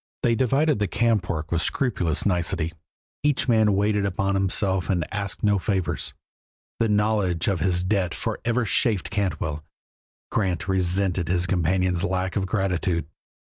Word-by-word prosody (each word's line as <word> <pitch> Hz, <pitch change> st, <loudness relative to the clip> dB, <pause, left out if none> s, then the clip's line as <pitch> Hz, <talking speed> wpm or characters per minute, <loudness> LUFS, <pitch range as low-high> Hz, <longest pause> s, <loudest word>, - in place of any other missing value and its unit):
They 120 Hz, -, +3 dB
divided 135 Hz, +3 st, +2 dB
the 105 Hz, -, +1 dB
camp 105 Hz, -1 st, +1 dB
work 80 Hz, -3 st, -3 dB
with 85 Hz, -1 st, +1 dB
scrupulous 90 Hz, -, 0 dB
nicety, 85 Hz, -3 st, 0 dB, 0.5 s
each 145 Hz, -2 st, +1 dB
man 110 Hz, -4 st, +4 dB
waited 105 Hz, +1 st, +1 dB
upon 100 Hz, 0 st, 0 dB
himself 95 Hz, -1 st, +1 dB
and 90 Hz, -5 st, +1 dB
asked 100 Hz, -2 st, -3 dB
no 105 Hz, -2 st, +3 dB
favors. 95 Hz, -4 st, -1 dB, 0.6 s
The 115 Hz, -, +2 dB
knowledge 105 Hz, -5 st, +1 dB
of 100 Hz, -4 st, +1 dB
his 90 Hz, +1 st, +1 dB
debt 95 Hz, -2 st, 0 dB
forever 120 Hz, 0 st, -1 dB
chafed 105 Hz, -2 st, +1 dB
Cantwell; 80 Hz, -6 st, -2 dB, 0.7 s
Grant 95 Hz, -6 st, -1 dB
resented 95 Hz, -1 st, +1 dB
his 90 Hz, 0 st, +1 dB
companion's 90 Hz, 0 st, +1 dB
lack 95 Hz, -1 st, -1 dB
of 95 Hz, -2 st, 0 dB
gratitude. 90 Hz, -4 st, 0 dB
95 Hz, 145 wpm, -24 LUFS, 90-105 Hz, 0.7 s, man